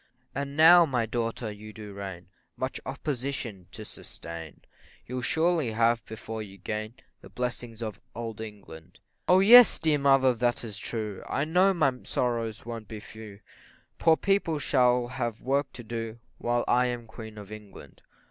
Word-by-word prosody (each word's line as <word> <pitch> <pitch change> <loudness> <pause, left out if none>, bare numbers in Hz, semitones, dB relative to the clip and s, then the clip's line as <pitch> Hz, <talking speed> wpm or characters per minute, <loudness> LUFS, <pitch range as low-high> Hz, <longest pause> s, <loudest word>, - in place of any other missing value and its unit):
And 140 +1 -4
now, 170 +2 +9
my 125 -5 0
daughter, 115 0 -3
you 105 +1 -10
do 105 -2 -9
reign, 95 -3 -7 0.3
Much 130 +1 -3
opposition 135 - -4
to 110 +1 -8
sustain, 85 -5 -9 0.4
You'll 125 +1 -4
surely 160 -2 +1
have, 115 +1 +2
before 110 0 -6
you 100 -2 -9
gain 110 +4 -4 0.3
The - - -13
blessings 120 -2 -4
of 110 -2 -6
Old 115 -2 -5
England, 95 -6 -10 0.3
O 185 +1 +6
yes, 240 +4 +9
dear 155 -2 +2
mother, 135 -2 +5
that 120 +1 0
is 110 -4 -7
true, 105 -4 -4
I 140 - 0
know 185 +4 +4
my 135 -6 +3
sorrows 115 -3 -1
won't 115 -2 -6
be 110 -2 -7
few, 105 -1 -11 0.6
Poor 160 -1 +5
people 195 -5 +1
shall 125 -4 +3
have 120 -3 -4
work 140 +3 0
to 120 - -9
do, 115 0 -5 0.2
While 120 0 0
I 125 +1 +3
am 120 -1 -4
Queen 110 -1 -10
of 105 0 -10
England. 105 -2 -12
120 Hz, 160 wpm, -28 LUFS, 110-135 Hz, 0.6 s, now